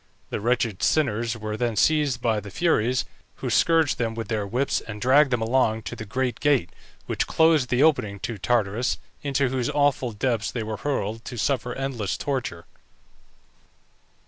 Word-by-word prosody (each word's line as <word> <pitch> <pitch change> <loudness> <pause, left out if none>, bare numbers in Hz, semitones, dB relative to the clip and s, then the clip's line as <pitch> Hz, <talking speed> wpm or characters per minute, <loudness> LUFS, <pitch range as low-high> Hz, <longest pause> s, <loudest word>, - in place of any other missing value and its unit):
The - - -3
wretched 115 -3 0
sinners 120 -6 +1
were 110 0 -4
then 120 0 -1
seized 140 +2 +2
by 110 -2 +2
the 105 0 -9
Furies, 130 - +1 0.3
who - - -4
scourged 165 -3 +3
them 115 -2 -1
with 115 -1 -5
their 105 -3 -1
whips, 125 +7 0
and 105 -2 -8
dragged 135 +5 +5
them 120 -3 0
along 110 -2 +1
to - - -6
the 110 - -7
great 125 +2 -2
gate, 140 - +2 0.3
which - - -1
closed 160 -5 +3
the 125 +3 +3
opening 110 -11 +2
to 115 -4 -4
Tartarus, 115 +1 0 0.2
into 140 -2 0
whose 125 -1 -1
awful 145 -4 +1
depths 115 0 -1
they 115 - -3
were 110 0 -4
hurled, 115 -5 -2
to 120 - -6
suffer 125 +1 -1
endless 130 -7 -2
torture. 130 -12 -3
120 Hz, 170 wpm, -25 LUFS, 110-135 Hz, 0.3 s, dragged